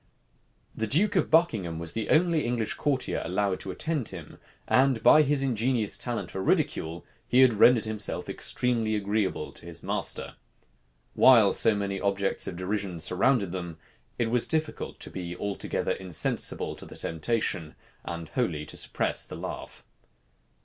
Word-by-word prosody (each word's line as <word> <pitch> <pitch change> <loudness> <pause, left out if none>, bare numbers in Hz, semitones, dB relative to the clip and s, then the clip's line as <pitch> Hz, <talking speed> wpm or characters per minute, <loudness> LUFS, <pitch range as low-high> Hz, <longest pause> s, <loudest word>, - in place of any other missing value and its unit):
The 110 - -3
duke 195 - +3
of 180 - +2
Buckingham 110 - +2
was 85 0 -3
the 110 - -3
only 165 -2 +3
English 120 -3 -1
courtier 140 -3 -1
allowed 95 +2 -1
to - - -6
attend 145 - -2
him; 85 -5 -10 0.3
and 130 -2 +3
by 155 - +8
his 145 -1 +2
ingenious 120 -3 0
talent 120 -2 -3
for 95 - -4
ridicule, 80 -3 0 0.2
he 125 - +4
had 130 -3 +6
rendered 115 +2 +5
himself 110 -1 -3
extremely 115 -3 -1
agreeable 105 -1 -1
to - - -17
his 85 -2 -9
master. - - -4 0.8
While 115 -6 +6
so 110 -2 +4
many 100 -1 -3
objects 100 -1 0
of 90 - -4
derision 95 0 -3
surrounded 100 +4 +2
them, 85 -3 -6 0.4
it 115 -1 0
was 120 -1 +2
difficult 155 -1 -2
to - - -3
be 90 -1 -6
altogether 100 -1 -2
insensible 90 -4 0
to - - -8
the - - -11
temptation, 80 -2 -2 0.3
and 85 -2 -6
wholly 85 - -1
to - - -8
suppress - - -1
the - - -9
laugh. - - -7
105 Hz, 155 wpm, -27 LUFS, 90-125 Hz, 0.8 s, by